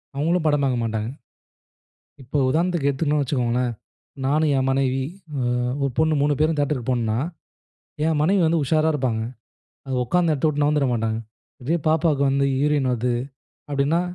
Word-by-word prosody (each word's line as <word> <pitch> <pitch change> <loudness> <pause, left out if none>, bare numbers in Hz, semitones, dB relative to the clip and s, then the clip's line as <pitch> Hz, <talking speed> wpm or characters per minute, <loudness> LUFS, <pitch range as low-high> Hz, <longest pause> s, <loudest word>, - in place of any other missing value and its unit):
அவங்களும் 160 +4 0
படம் 145 -1 +2
பாக்க 130 -2 +1
மாட்டாங்க. 110 -1 -2 1.1
இப்போ, 130 +4 -3
உதாரணத்துக்கு 165 0 +1
எடுத்துக்குட்டோம் 145 +2 0
வச்சுக்கோங்களேன். 125 -2 0 0.5
நானும் 150 +3 +2
என் 130 0 +1
மனைவி, 135 0 +1 0.3
அ - - 0 0.4
1 140 - 0
பொண்ணு 155 0 +3
3 145 +1 +2
பேரும் 155 0 +2
தேட்டருக்கு 140 -4 -1
போனோம்ன்னா, 115 -3 0 0.9
என் 160 -2 +1
மனைவி 190 +5 +3
வந்து, 160 0 +2
உஷாரா 155 +3 +2
இருப்பாங்க. 125 -6 -1 0.6
அதை 130 - -2
ஒக்காந்த 170 +5 +2
எடத்தை 150 +1 +1
விட்டு, 145 -1 0
நவுந்துர 145 -2 +2
மாட்டாங்க. 110 -1 -1 0.4
அப்படியே 155 +7 -1
பாப்பாவுக்கு 155 -3 +2
வந்து 140 0 +2 0.2
யூரின் 145 -2 +2
வருது 125 0 0 0.6
அப்படின்னா, 145 +4 +1
140 Hz, 150 wpm, -23 LUFS, 130-155 Hz, 1.1 s, பொண்ணு